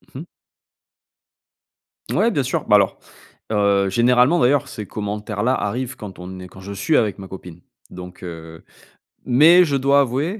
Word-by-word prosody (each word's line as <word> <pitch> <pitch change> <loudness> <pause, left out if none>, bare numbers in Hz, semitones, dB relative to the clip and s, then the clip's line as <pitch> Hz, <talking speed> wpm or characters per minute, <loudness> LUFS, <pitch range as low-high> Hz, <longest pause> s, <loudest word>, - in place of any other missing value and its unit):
Mmh - - -6
mh. - - -10 1.8
Ouais, 185 - +2
bien 145 -10 0
sûr, 130 - -3
bah, 105 - +5
alors 100 -1 +2 0.5
heu, 100 -2 +2
généralement, 125 - +3
d'ailleurs, 140 +1 +2
ces 110 -5 -7
commentaires-là 105 +3 -3
arrivent 125 +4 -3
quand 105 -6 -10
on 95 +1 -9
est 90 - -9
quand 95 - -15
je 100 +2 -8
suis 100 +11 +1
avec 105 -4 0
ma 95 - -9
copine. 90 -2 -11 0.3
Donc, 90 0 -11
heu 80 -2 -9 0.6
mais 160 +8 +6
je 145 -4 -1
dois 140 +1 +3
avouer 140 - -2
105 Hz, 160 wpm, -20 LUFS, 95-135 Hz, 1.8 s, mais